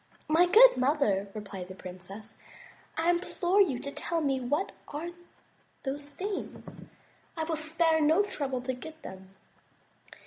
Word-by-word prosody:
"My 330 +3 +5
good 485 +7 +8
mother,'* 255 -8 +2
replied 195 -3 -6
the 185 - -9
princess, 185 +4 -10 0.6
"I 330 +2 +3
implore 355 +2 +2
you 290 -11 +3
to 280 - -5
tell 335 +3 -2
me 275 -4 +1
what 290 +10 -1 0.2
are 310 +4 -5 0.7
those 285 +1 -4
things. 385 +6 -6 0.6
I 320 - 0
will 320 0 -1
spare 320 +1 +2
no 320 +7 +4
trouble 275 -10 -3
to 260 0 -1
get 315 +5 -10
them. 190 0 -10
295 Hz, 140 wpm, -29 LUFS, 245-335 Hz, 0.7 s, good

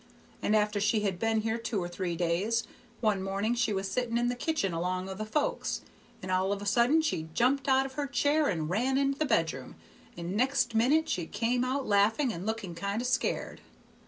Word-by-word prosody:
And 215 - +2
after 210 -1 +2
she 215 +1 +2
had 195 -4 -1
been 225 0 +1
there 225 +1 -1
two 230 -1 -3
or 175 - -2
three 175 0 -3
days, 180 +7 0 0.4
one 210 -4 +2
morning 195 +4 -1
she 240 -2 +1
was 195 -1 -1
sitting 235 +2 -1
in 240 0 +1
the 245 - -1
kitchen 245 - -1
'long 180 +2 -2
o' 190 - -4
the 215 +3 -5
folks, 290 +6 -1 0.4
and 185 - -4
all 185 +1 +1
of 200 - -1
a 205 - -7
sudden 240 +10 +3
she 160 - -2
jumped 270 +3 +2
out 265 0 +4
of 265 - -7
her 290 +1 -2
chair 290 +3 +2
and 160 - -1
ran 250 +7 +1
into 275 0 +1
the 310 - +2
bedroom, 160 - 0 0.4
and 175 +3 -4
next 255 +1 +1
minute 280 +8 +3
she 175 -3 -2
come 245 +1 0
out 260 +1 -1
laughing, 220 +5 +3
and 180 +5 -6
looking 220 -5 -3
kind 200 +5 -2
of 250 - -2
scared. 255 - -1
220 Hz, 215 wpm, -29 LUFS, 190-255 Hz, 0.4 s, out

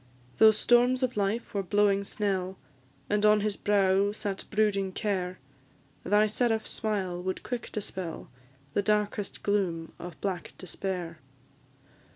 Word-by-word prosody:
Though 220 - +9
storms 245 +4 +3
of 250 -1 0
life 210 +3 -1
were 200 - 0
blowing 200 +1 +2
snell, 190 -2 -2 0.5
And 210 0 +1
on 210 0 +5
his 210 -1 0
brow 200 0 +2
sat 205 -2 -4
brooding 200 -3 +1
care, 185 -4 -2 0.7
Thy 210 +1 +4
seraph 220 +1 0
smile 190 -5 -2
would 185 +1 -3
quick 245 -2 -5
dispel 190 -5 -5 0.5
The 205 - +2
darkest 210 -1 -1
gloom 180 -5 0
of 175 -2 -8
black 190 -3 -3
despair. 180 -3 -5
200 Hz, 130 wpm, -29 LUFS, 190-215 Hz, 0.7 s, Though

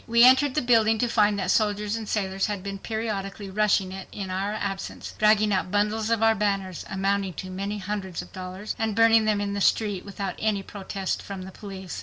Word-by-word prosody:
We 235 +1 +5
entered 260 +2 +6
the 300 - +1
building 225 -2 +4
to 245 - +1
find 210 -3 +3
that 185 -1 0
soldiers 210 0 +1
and 225 -2 -5
sailors 195 -1 0
had 205 -3 -4
been 195 0 -5
periodically 205 -2 -4
rushing 200 -2 +2
it 190 0 -7
in 195 -2 -5
our 195 +2 -1
absence, 200 -2 -4
dragging 215 -1 +4
out 185 -1 0
bundles 210 +2 0
of 230 -1 +2
our 225 0 +6
banners, 195 -4 -1
amounting 195 0 0
to 185 +4 -7
many 200 +3 -3
hundreds 190 -2 -4
of - - -16
dollars, 185 +2 -6
and 220 -2 0
burning 225 0 +5
them 215 -1 +2
in 200 0 -2
the 200 - -2
street, 205 -2 +2
without 200 -2 -4
any 210 -2 0
protest 195 -1 -4
from 195 -2 -7
the 190 - -9
police. 190 -3 -8
205 Hz, 210 wpm, -26 LUFS, 195-215 Hz, -, entered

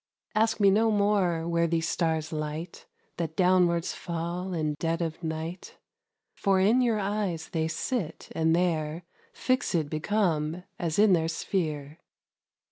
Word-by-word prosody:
Ask 225 +1 +2
me 200 -1 +6
no 220 +3 +3
more 200 -6 +2
where 170 0 +2
those 165 0 0
stars 160 -2 0
'light 155 +2 -5 0.3
That 160 -2 -3
downwards 180 -2 +3
fall 175 +2 -4
in 155 -3 -1
dead 165 0 0
of 165 -1 -3
night; 160 +2 -5 0.6
For 195 -1 +2
in 220 +7 +4
your 235 -3 +2
eyes 195 -5 -2
they 160 -3 -1
sit, 165 +1 -3
and 160 0 +2
there 165 -2 0 0.3
15 255 -10 +1
Fixèd - - -13
become 165 -1 0 0.2
as 165 -2 -1
in 205 -1 +6
their 165 -2 +2
sphere. 155 -3 -3
170 Hz, 140 wpm, -28 LUFS, 160-195 Hz, 0.6 s, me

